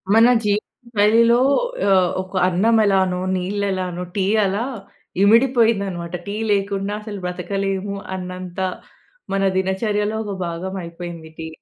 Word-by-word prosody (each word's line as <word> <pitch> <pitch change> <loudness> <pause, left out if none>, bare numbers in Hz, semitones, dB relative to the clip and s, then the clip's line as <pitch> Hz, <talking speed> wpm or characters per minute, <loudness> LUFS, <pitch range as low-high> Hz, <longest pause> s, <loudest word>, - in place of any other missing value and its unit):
మన 225 +1 +7 0.2
జీవిత 205 0 +1 0.4
శైలిలో 230 +3 +5 0.5
ఆహ్, 185 -2 +3
‌ఒక 185 +1 -12
అన్నం 200 +6 +2
ఎలానో, 190 -2 +2 0.2
నీళ్ళు 200 +3 -2
ఎలానో, 180 -1 -3
టీ 195 -2 +1 0.2
అలా 200 +4 0 0.6
ఇమిడిపోయిందన్నమాట. 215 -7 +3
టీ 200 - -3 0.2
లేకుండా 200 0 0
అసలు 210 -2 -7
బతకలేము 195 +2 -3 0.2
అన్నంత 180 0 -7 0.7
మన 195 0 +1
దినచర్యలో 205 +3 0
ఒక 200 -2 -4
భాగం 180 +3 -5
అయిపోయింది 170 -1 -8
టీ. 160 - -5
195 Hz, 120 wpm, -21 LUFS, 180-205 Hz, 0.7 s, మన